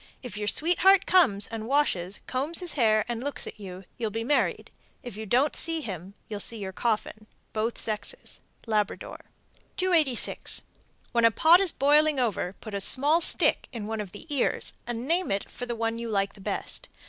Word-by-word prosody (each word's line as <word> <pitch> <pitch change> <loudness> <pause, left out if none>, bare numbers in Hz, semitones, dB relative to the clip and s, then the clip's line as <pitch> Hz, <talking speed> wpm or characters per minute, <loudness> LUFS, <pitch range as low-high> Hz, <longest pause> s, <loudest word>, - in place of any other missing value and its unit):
If 245 - -7
your 210 0 -4
sweetheart 360 - +4
comes 210 - +3
and 225 -1 -6
washes, 205 -10 0
combs 280 +6 -2
his 360 -2 -2
hair, 215 -5 +2
and 240 0 -4
looks 285 0 -4
at - - -10
you, 190 -2 -9 0.2
you'll 225 -2 -1
be 225 +2 -4
married. 285 +5 0 0.3
If 245 -5 -8
you 220 0 -7
don't 260 +8 +2
see 330 -1 -1
him, 190 - -7
you'll 210 -2 -5
see 230 +3 0
your 195 -3 -5
coffin. 215 0 -2 0.3
(Both 225 +2 -2
sexes.) 210 -2 -5 0.3
Labrador. 215 -3 -3 0.5
286. 325 -9 +4 0.5
When 235 -1 +1
a 230 - +7
pot 320 - +5
is 385 -3 +4
boiling 295 +1 +3
over, 205 -6 -1
put 215 - -9
a 200 - -1
small 290 - +3
stick - - +3
in 230 -5 -6
one 220 0 -3
of 200 -3 -8
the 205 - -11
ears 265 - 0
and 240 +1 -4
name 345 +3 +1
it 195 0 -3
for 245 - -7
the 240 - -3
one 225 0 -2
you 235 0 -5
like 195 -2 -1
best. - - -4
230 Hz, 185 wpm, -27 LUFS, 210-290 Hz, 0.5 s, a